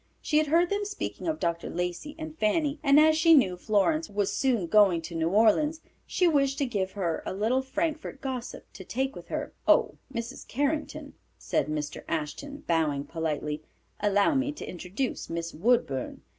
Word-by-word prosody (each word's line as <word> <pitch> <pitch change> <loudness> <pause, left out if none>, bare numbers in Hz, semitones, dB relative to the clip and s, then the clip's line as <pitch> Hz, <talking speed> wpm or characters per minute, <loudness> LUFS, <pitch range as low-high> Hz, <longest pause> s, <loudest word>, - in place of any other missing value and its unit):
She 300 - +2
had 310 - +1
heard 340 +4 +3
them 405 +1 0
speak 410 0 -5
of 320 -2 -2
Dr. 170 -1 -2
Lacey 180 - -4
and 315 -1 -7
Fanny, 290 +5 +1
and 280 -1 +6
as 310 0 +6
she 325 +1 +6
knew 190 -11 +4
Florence 215 - +1
was 205 -1 -1
soon 245 -9 +1
going 195 -2 +5
to 170 - -7
New 165 0 0
Orleans, 230 - +3 0.3
she 360 - +2
wished 275 -4 +2
to 280 - +1
give 195 -6 -2
her 175 -5 -2
a - - -4
little 225 +6 +1
Frankfort 305 +1 -3
gossip 255 -3 -5
to 190 - -9
take 265 +7 -2
with - - -10
her. - - -4
"Oh, - - +4
Mrs. 235 +1 -6
Carrington," 290 +4 -2 0.2
said - - -1
Mr. 150 -1 -4
Ashton, 275 - -4
bowing 155 -4 +1
politely, 150 -2 -3 0.4
"allow 205 +6 +3
me 275 +1 +1
to - - -8
introduce 190 +8 -4
Miss 165 0 -4
Woodburn. 170 - 0
235 Hz, 175 wpm, -28 LUFS, -, 0.4 s, and